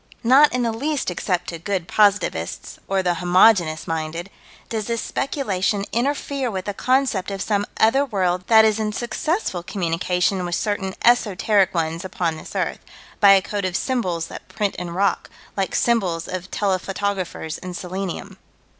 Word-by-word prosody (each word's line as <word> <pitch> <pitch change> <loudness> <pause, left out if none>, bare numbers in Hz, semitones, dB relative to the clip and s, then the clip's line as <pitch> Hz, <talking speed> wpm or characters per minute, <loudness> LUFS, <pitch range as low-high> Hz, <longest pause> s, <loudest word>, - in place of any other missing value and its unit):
Not 270 +5 +6
in 250 0 0
the 230 - +1
least 280 0 -2
except 180 0 -2
to 170 - -6
good 185 -1 -2
positivists, 205 -1 +1
or 195 -1 0
the 180 -1 +2
homogeneous 175 -2 +4
minded, 165 +3 -4 0.4
does 220 -2 -3
this 230 -1 -1
speculation 200 -8 -1
interfere 275 +1 -1
with 190 -4 -4
the 205 - -3
concept 255 -5 +1
of 195 -1 -4
some 205 0 0
other 245 +6 +4
world 185 -7 -1
that 220 -1 +7
is 215 0 +2
in 215 -1 -1
successful 240 - -2
communication 180 +1 -1
with 175 -1 -2
certain 195 -2 -2
esoteric 205 -5 +3
ones 165 +1 -1
upon 175 -3 -2
this 155 - -11
earth, - - -1 0.4
by 200 -1 +8
a 195 -1 +4
code 205 -1 -3
of 185 -1 -2
symbols 185 -11 -1
that - - -10
print 210 -3 -2
in 180 0 -4
rock, 195 +4 0 0.3
like 195 -1 -1
symbols 185 -9 +1
of 185 0 -5
telephotographers 190 -4 -2
in 180 -1 -7
selenium. 185 0 -5
195 Hz, 160 wpm, -22 LUFS, 180-220 Hz, 0.4 s, by